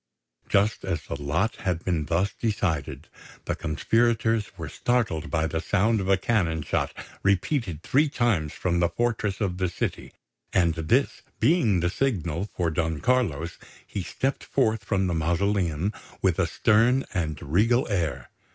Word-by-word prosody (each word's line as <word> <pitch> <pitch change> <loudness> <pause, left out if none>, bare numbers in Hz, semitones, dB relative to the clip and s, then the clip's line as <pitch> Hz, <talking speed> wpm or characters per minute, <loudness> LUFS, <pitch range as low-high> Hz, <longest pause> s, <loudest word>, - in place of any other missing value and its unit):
Just 105 +3 +2
as 90 -3 -2
the 70 - -6
lot 80 +10 0
had 90 -4 -2
been 85 -5 0
thus 90 +5 +1
decided, 95 -10 -2 0.4
the - - 0
conspirators 110 +5 +1
were 80 -3 -5
startled 100 - -1
by 80 -1 +1
the 80 0 -2
sound 110 +5 +2
of 95 - -3
a 95 - +5
cannon 90 -7 0
shot - - -1 0.3
repeated 100 - 0
three 145 +3 +3
times 110 - +1
from 85 -1 -1
the 85 -1 +3
fortress 110 0 -1
of 95 -4 -1
the 90 -1 +1
city; 85 - -4 0.4
and 85 -3 +3
this 80 - +1 0.2
being 120 - +3
the 85 - +1
signal 90 - -1
for 85 -2 -1
Don 80 -1 -1
Carlos, 85 - 0 0.3
he 100 - -4
stepped 135 +9 -2
forth 110 -6 +1
from 95 -1 0
the 90 - 0
mausoleum 85 +2 0 0.3
with 95 -2 +1
a 90 - +3
stern 115 +9 +3
and 80 -6 -2
regal 110 - +2
air. 85 -8 -2
95 Hz, 155 wpm, -26 LUFS, 80-110 Hz, 0.4 s, a